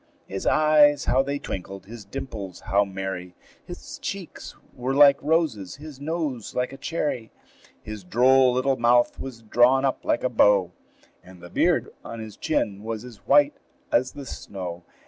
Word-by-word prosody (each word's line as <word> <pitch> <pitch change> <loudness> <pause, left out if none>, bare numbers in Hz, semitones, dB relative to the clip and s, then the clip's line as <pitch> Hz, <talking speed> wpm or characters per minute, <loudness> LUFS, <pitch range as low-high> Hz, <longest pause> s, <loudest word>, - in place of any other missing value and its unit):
His 95 0 -5
eyes 150 -1 +5
how 130 - +3
they 140 +1 -2
twinkled! 95 -6 -7
his 110 +1 -10
dimples 100 -5 -7
how 100 +2 +2
merry! 95 -2 -6 0.3
His - - -9
cheeks - - -7 0.2
were 130 +2 -2
like 140 -1 +7
roses, 145 - 0
his 150 -2 -11
nose 150 -6 -3
like 125 +1 -1
a - - -9
cherry; 145 -6 -3 0.5
His 110 -2 -7
droll 130 +6 +4
little 130 +2 +1
mouth 120 +1 +3
was 120 -4 -8
drawn 125 +4 +4
up 135 - -1
like - - 0
a - - +3
bow, 100 -6 +4 0.5
And 90 0 -15
the 90 0 -12
beard - - +1
on 115 - -7
his 110 -2 -8
chin 100 -1 -1
was 110 +1 -5
as 120 -4 -11
white 145 +1 +4 0.3
as 130 +2 +2
the 140 -1 -8
snow. 90 -7 -7
120 Hz, 165 wpm, -25 LUFS, 100-135 Hz, 0.5 s, like